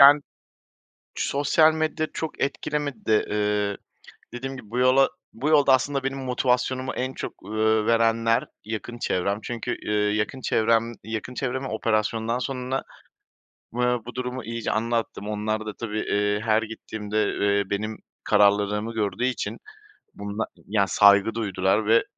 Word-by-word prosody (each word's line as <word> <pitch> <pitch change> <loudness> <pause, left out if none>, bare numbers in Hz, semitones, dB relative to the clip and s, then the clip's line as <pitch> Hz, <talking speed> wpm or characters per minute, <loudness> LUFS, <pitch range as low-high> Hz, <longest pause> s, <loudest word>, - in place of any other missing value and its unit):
Yan 145 +1 +9 0.9
sosyal 155 +3 +3
medya 155 0 -1
çok 160 -2 -5
etkilemedi 145 -2 -2
de, 110 -1 +3
eee, 105 -1 0 0.6
dediğim 135 +2 -5
gibi 105 - -12
bu 125 +2 -2
yola 130 +2 +5 0.2
bu 140 +7 -2
yolda 145 -3 +6
aslında 135 +1 +1
benim 135 0 -2
motivasyonumu 130 0 0
en 130 +1 -2
çok, - - -5
ııı, 110 +1 +2
verenler 115 0 +3 0.2
yakın 115 +2 -5
çevrem. 100 +2 0
Çünkü, 120 -2 -3
eee, 105 - -4 0.2
yakın 115 +5 -2
çevrem 115 +1 +2
yakın 110 +3 -5
çevreme 130 +1 -2
operasyondan 110 +2 0
sonra, 130 0 -2 0.9
eee, 125 - -2 0.3
bu 120 - -7
durumu 125 -1 -4
iyice 115 0 -3
anlattım. 115 -2 -1
Onlar 110 +1 -2
da 105 - -4
tabii, 110 -2 -3
eee, 105 0 0
her 110 0 +2
gittiğimde, 110 -1 -3 0.2
eee, 100 -1 +1
benim 110 +2 -2 0.3
kararlılığımı 105 +1 +3
gördüğü 110 +3 -1
için 130 -1 -2 0.6
bunda 100 +2 -3 0.2
ya 100 -1 +2
saygı 100 +2 +5
duydular 100 -1 +1
ve 115 +1 +5
115 Hz, 140 wpm, -25 LUFS, 105-130 Hz, 0.9 s, Yan